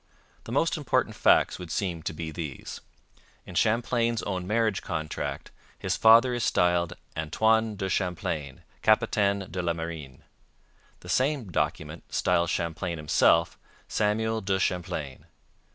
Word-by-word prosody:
The - - -7
most - - +1
important - - 0
facts - - +3
would 90 -2 -8
seem 85 -2 -2
to 80 - -4
be 80 0 -5
these. 75 -4 -6 0.6
In - - -10
Champlain's 115 +1 +1
own 90 -2 -3
marriage 110 -2 +1
contract 80 -4 -4 0.3
his - - -1
father 115 +3 +6
is 120 -1 -1
styled 90 -1 +2 0.2
'Antoine 110 +7 +1
de 95 -1 -3
Champlain, 85 -7 -3 0.2
Capitaine 105 -3 +2
de 90 - -2
la 85 -1 0
Marine.' 80 -5 -7 0.8
The 90 - -11
same 130 -2 0
document - - -2
styles 85 0 +1
Champlain 85 +1 -2
himself 80 +2 +3 0.3
'Samuel 110 +1 0
de 95 0 0
Champlain.' 90 -7 -3
90 Hz, 130 wpm, -27 LUFS, 85-110 Hz, 0.8 s, father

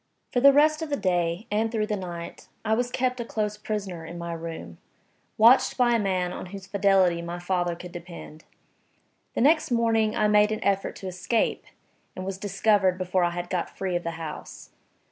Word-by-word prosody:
FOR 245 - +3
the 280 +3 +8
rest 305 +3 +4
of 320 - -4
the 285 - 0
day, 175 0 0
and 220 +2 +1
through 220 -2 0
the 210 -1 -2
night, 175 -3 -7 0.2
I 220 - +2
was 245 +2 0
kept 255 0 -1
a - - -1
close 210 -2 -2
prisoner 200 -5 -4
in 170 +1 -8
my 170 0 -5
room, 165 - -7 0.6
watched 230 +4 +5
by 245 -2 +4
a 230 - +3
man 185 -3 -1
on - - -7
whose 195 +1 -9
fidelity 195 -3 +3
my 170 +1 -5
father 175 -1 -1
could 175 +1 -10
depend. 170 -2 -10 0.9
The - - 0
next 310 +4 +4
morning 225 -2 +2
I 215 - +2
made 210 0 +4
an 215 - -3
effort 195 -1 0
to 190 - -7
escape, 185 +5 -1 0.5
and 185 - -6
was 190 0 -4
discovered 195 -1 +2
before 185 0 0
I 175 - +3
had 175 0 -5
got 180 -2 -3
free 190 -2 -2
of 175 - 0
the 170 - -2
house. 160 -2 -8
195 Hz, 200 wpm, -26 LUFS, 175-220 Hz, 0.9 s, the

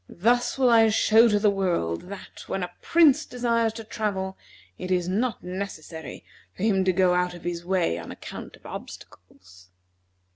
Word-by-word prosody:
Thus 240 +8 +1
will 255 -2 +4
I 225 -1 +6
show 220 +2 +5
to 210 -2 +3
the 205 0 +3
world 180 - -1
that, 200 -1 -10
when 190 - -2
a 180 - -5
prince 315 -3 +4
desires 235 -4 0
to 225 0 -7
travel, 200 -4 -3 0.4
it 185 - -5
is 180 -1 +1
not 220 +6 -1
necessary 170 -6 -7 0.3
for - - -5
him 195 -4 +3
to 185 - +4
go 185 0 +3
out 180 0 0
of 175 - -12
his 175 -1 -4
way 175 - 0
on 85 - -9
account - - -9
of - - -24
obstacles." 90 0 -12
190 Hz, 175 wpm, -25 LUFS, 175-225 Hz, 0.4 s, I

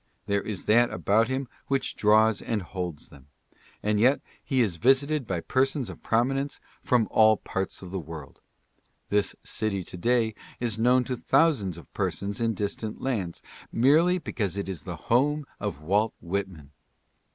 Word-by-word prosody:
There 100 0 +1
is 105 -4 -5
that 120 +3 +5
about 110 +3 +2
him 130 +1 -2 0.2
which 135 -1 0
draws 110 0 +4
and 110 -4 -2
holds 90 -3 -6
them. 70 -1 -16 0.6
And 105 0 +1
yet 130 +6 +4 0.2
he 135 - 0
is 100 -8 +1
visited 135 - +2
by 90 -3 -2
persons 130 - 0
of - - -13
prominence 135 +5 0 0.2
from 120 -4 +2
all 110 -1 +6
parts 95 0 -4
of 90 - -9
the 95 - -2
world. 80 -4 -9 0.7
This 105 0 +1
city 100 -4 -2
to 90 - -9
day 115 +2 +2 0.3
is 115 -3 -2
known 125 +2 +4
to 125 +1 -3
thousands 130 - +2
of 85 - -14
persons 100 +2 -2
in 115 -1 +1
distant 105 +2 -3
lands 100 -11 -3 0.3
merely 160 +9 +4
because 100 - -3
it 100 - -3
is 95 -6 -6
the - - -4 0.2
home 145 +5 +3
of 75 - -4
Walt 105 +6 +1
Whitman. 90 -5 -4
110 Hz, 165 wpm, -27 LUFS, 95-130 Hz, 0.7 s, all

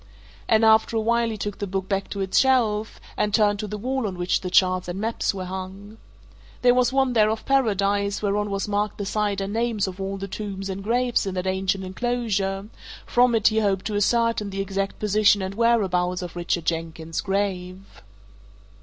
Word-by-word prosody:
And 220 0 +4
after 220 +1 +4
a - - +3
while 235 +1 +1
he 220 - -4
took 205 0 -5
the 205 - -3
book 190 0 -3
back 195 -1 -2
to 200 - -4
its 190 -1 +2
shelf, 225 -5 +1 0.2
and 210 - 0
turned 205 -2 +2
to 210 - -3
the 210 +1 -5
wall 255 +2 -2
on 185 -2 -6
which 175 +1 0
the 185 - -4
charts 185 0 +3
and 175 +2 -4
maps 225 +2 -1
were 190 -2 -6
hung. 190 +3 -8 0.6
There 245 0 +6
was 250 0 +2
one 265 -1 +2
there 215 -2 +4
of 220 0 -3
Paradise, 200 -6 +1
whereon 205 0 -1
was 195 0 -2
marked 205 0 -1
the 205 - -4
site 205 -1 -1
and 195 +1 -3
names 230 -2 0
of 190 0 -6
all 195 +1 -3
the 195 0 -5
tombs 195 -1 -5
and 195 +1 -6
graves 240 0 +1
in 190 - -3
that 180 0 -2
ancient 190 0 -1
enclosure; 200 -1 -2 0.4
from 245 -1 +3
it 220 -2 +4
he 220 0 +1
hoped 195 -3 0
to 210 - -2
ascertain 230 0 +1
the 195 0 -5
exact 195 0 -2
position 210 0 +3
and 190 +1 -4
whereabouts 190 -6 +1
of 175 -1 -7
Richard 175 -1 -2
Jenkins's 165 -1 -3
grave. 190 -1 -2
200 Hz, 200 wpm, -24 LUFS, 190-220 Hz, 0.6 s, There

